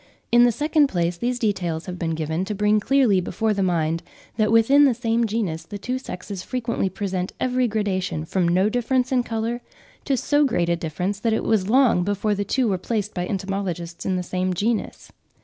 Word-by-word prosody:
In 240 +1 +7
the 240 - +4
second 300 +4 +2
place, 175 -6 -1
these 245 +7 -2
details 180 -8 -1
have 180 -1 -6
been 165 -2 -1
given 160 +2 -2
to 210 - -3
bring 210 +1 +3
clearly 235 -5 +3
before 220 +4 -1
the 200 - -1
mind 165 -3 0 0.3
that 215 -1 +1
within 270 +6 +6
the 260 -4 +3
same 230 -1 0
genus, 200 -7 -2
the 205 +5 -7
two 250 +6 -3
sexes 195 -5 -7
frequently 230 -3 -2
present 190 -1 -3
every 255 0 +1
gradation 190 -7 -2
from 180 +1 0
no 185 +4 +3
difference 245 +3 0
in 255 -1 +3
colour, 230 +1 -3 0.4
to 275 -3 +1
so 290 +4 +2
great 175 -11 +1
a 170 - +3
difference 180 +4 -3
that 225 +1 +1
it - - 0
was 210 -3 +1
long 245 -7 +4
before 205 +2 0
the 205 0 -1
two 250 +5 0
were 190 -3 0
placed 210 +1 -2
by 180 -1 -3
entomologists 190 -4 -4
in 190 - 0
the 180 - -1
same 185 +1 -2
genus. 220 +5 -2
205 Hz, 200 wpm, -23 LUFS, 180-235 Hz, 0.4 s, In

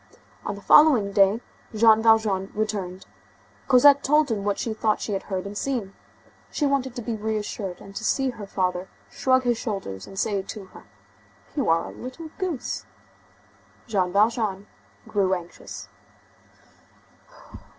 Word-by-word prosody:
On 205 - -2
the 200 - -12
following 260 -10 +6
day 200 +3 +4 0.3
Jean 220 0 +6
Valjean 220 -4 +3
returned. 200 -4 -3 0.6
Cosette 280 +2 +7
told 300 -1 +3
him 205 -3 -1
what 205 -1 0
she 225 - -2
thought 215 0 0
she - - -4
had 195 - -1
heard 190 -1 -2
and 200 +1 -7
seen. 225 -5 -2 0.6
She 295 - -1
wanted 270 -3 0
to 240 - -5
be 230 0 -2
reassured 210 -3 -3
and 195 0 -13
to - - -5
see 265 +4 +1
her 215 -4 -9
father 185 -1 -1 0.2
shrug 260 0 +2
his 240 -2 +1
shoulders 100 - -5
and 195 - -11
say 200 0 0
to 195 +1 -8
her: 185 - -15 0.7
"You 275 - 0
are 165 0 +3
a - - -7
little 260 +6 -8
goose." 360 -9 -3 1.0
Jean 190 -6 0
Valjean 210 -1 +1 0.4
grew 195 -3 +1
anxious. 175 -1 -9
215 Hz, 150 wpm, -25 LUFS, 195-245 Hz, 1.0 s, Cosette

